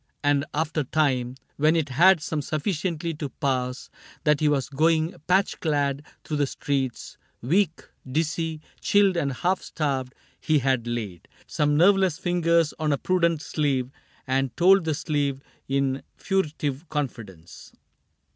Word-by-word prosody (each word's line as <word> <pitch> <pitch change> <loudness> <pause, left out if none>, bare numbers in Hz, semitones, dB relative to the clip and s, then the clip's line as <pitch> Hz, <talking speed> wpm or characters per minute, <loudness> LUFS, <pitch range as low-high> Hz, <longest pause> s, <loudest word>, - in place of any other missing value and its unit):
And 145 0 +2
after 155 0 -1
time. 130 -4 0 0.2
When 155 +3 +3
it 160 -3 0
had 165 +4 +5
come 155 -2 -1
sufficiently 165 +2 -2
to 150 -2 -5
pass 130 -2 -2 0.3
That 150 -1 +3
he 155 - +3
was 140 -3 0
going 160 +3 +1
patch 190 +2 +2
clad 145 -3 0 0.2
through 150 - -3
the 145 -1 +1
streets. 135 -3 -3 0.2
Weak, 165 - +1 0.3
dizzy, 160 +1 -1 0.2
chilled, 200 -2 +3
and 145 -5 0
half 180 +8 0
starved, 135 -5 -3 0.2
he 155 - +2
had 130 -3 0
laid. 110 -7 -5 0.2
Some 150 0 +1
nerveless 190 -1 +4
fingers 170 -3 +2
on 155 -1 0
a 140 - +2
prudent 170 -1 +1
sleeve 135 -4 -1 0.3
And 130 -1 -1
told 185 +1 +5
the 160 -2 0
sleeve, 140 -3 -1 0.3
in 135 0 0 0.2
furtive 155 -5 -2
confidence. 105 - -6
150 Hz, 135 wpm, -25 LUFS, 135-165 Hz, 0.3 s, had